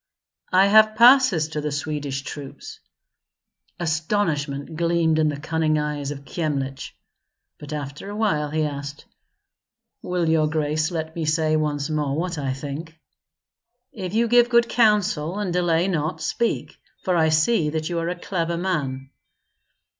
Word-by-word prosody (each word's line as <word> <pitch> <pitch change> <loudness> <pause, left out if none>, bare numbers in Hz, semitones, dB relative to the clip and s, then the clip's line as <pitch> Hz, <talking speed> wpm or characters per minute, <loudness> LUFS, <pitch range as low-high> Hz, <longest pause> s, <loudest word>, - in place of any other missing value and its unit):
"I 185 +1 +5
have 215 +1 +5
passes 235 - +6
to 155 -1 -3
the 150 0 -3
Swedish 145 -2 -3
troops." 140 -1 -9 1.0
Astonishment 160 -3 -1
gleamed 165 -1 +1
in 155 -1 +3
the 145 -1 -4
cunning 155 0 0
eyes 150 -2 -2
of 140 -1 -7
Kyemlich; 140 -5 -3 0.6
but 150 0 -9
after 145 +4 -6
a 205 - -6
while 160 -9 0
he 155 +1 0
asked, 145 -1 -5 1.0
"Will 180 -2 -1
your 160 -1 +3
grace 155 0 0
let 160 -2 -4
me 165 -2 -2
say 155 0 +1
once 145 -2 -1
more 150 -2 -1
what 175 -1 -2
I 135 -2 -2
think?" 150 +4 -7 0.9
"If 190 -2 -5
you 235 +1 +3
give 240 +1 +5
good 235 -1 +4
counsel 205 -8 +2
and 200 -4 -2
delay 175 0 +2
not, 160 -2 -1
speak; 235 - -2 0.2
for 185 -2 +1
I 160 -2 +3
see 155 +2 +2
that 155 0 -3
you 175 -1 -2
are 165 +1 -2
a 180 - -4
clever 170 -2 -2
man." 140 -7 -3
160 Hz, 150 wpm, -23 LUFS, 150-180 Hz, 1.0 s, passes